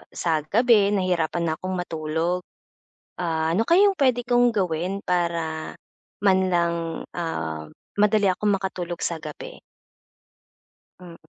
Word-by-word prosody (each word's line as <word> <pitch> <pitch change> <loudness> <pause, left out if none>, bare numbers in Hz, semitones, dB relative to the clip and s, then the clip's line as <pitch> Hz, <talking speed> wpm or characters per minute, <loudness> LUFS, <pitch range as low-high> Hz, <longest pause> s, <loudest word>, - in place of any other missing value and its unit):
sa 160 -3 +1
gabi 210 -2 +4
nahihirapan 175 -3 0
na 160 -2 0
akong 185 0 -3
matulog. 165 0 -2 0.8
Ah, 160 -1 0
ano 195 - +2
kaya 340 - +5
'yong 395 -2 +2
puwede 250 -3 +2
kong 245 0 +4
gawin 190 -2 -2
para 170 -3 -1 0.4
manlang 175 -4 +1
ah, 80 - -4 0.3
madali 210 0 +4
akong 190 +3 +1
makatulog 185 -3 -2
sa 165 -2 -3
gabi? - - -9 1.4
Hmm. 175 -2 -11
180 Hz, 115 wpm, -24 LUFS, 165-205 Hz, 1.4 s, kaya